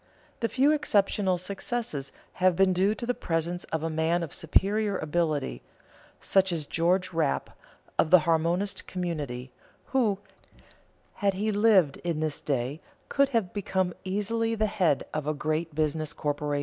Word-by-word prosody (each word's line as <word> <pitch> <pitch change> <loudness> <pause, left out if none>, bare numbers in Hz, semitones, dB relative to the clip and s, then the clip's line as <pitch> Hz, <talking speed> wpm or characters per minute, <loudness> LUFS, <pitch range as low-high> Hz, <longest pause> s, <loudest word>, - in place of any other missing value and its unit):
The 230 - 0
few 275 +3 +3
exceptional 200 -9 +2
successes 190 - -4 0.3
have 185 -1 +5
been 190 +1 +4
due 195 +4 +2
to 235 - -5
the 245 - +1
presence 170 -2 -2
of 160 -1 -3
a 165 - 0
man 160 +2 +1
of 155 - -6
superior 200 +5 +1
ability, 155 -3 -1 0.6
such 190 -1 +2
as 160 -3 -1
George 180 +4 +1
Rapp 160 -4 0 0.5
of 155 - +4
the 180 0 +7
Harmonist 170 +5 0
Community, 145 -9 -4 0.4
who, 225 -7 +3 1.0
had 200 -2 +1
he 215 +3 0
lived 205 -8 +4
in 170 -3 -3
this 155 -2 -1
day, 135 +2 -2 0.3
could 280 0 +3
have 225 -9 0
become 190 -3 -1
easily 225 +4 -1
the 215 0 +1
head 180 -9 +1
of 155 -1 -3
a 155 - 0
great 155 +1 -2
business 155 0 0
corporation. 145 -1 -1
175 Hz, 150 wpm, -28 LUFS, 155-200 Hz, 1.0 s, the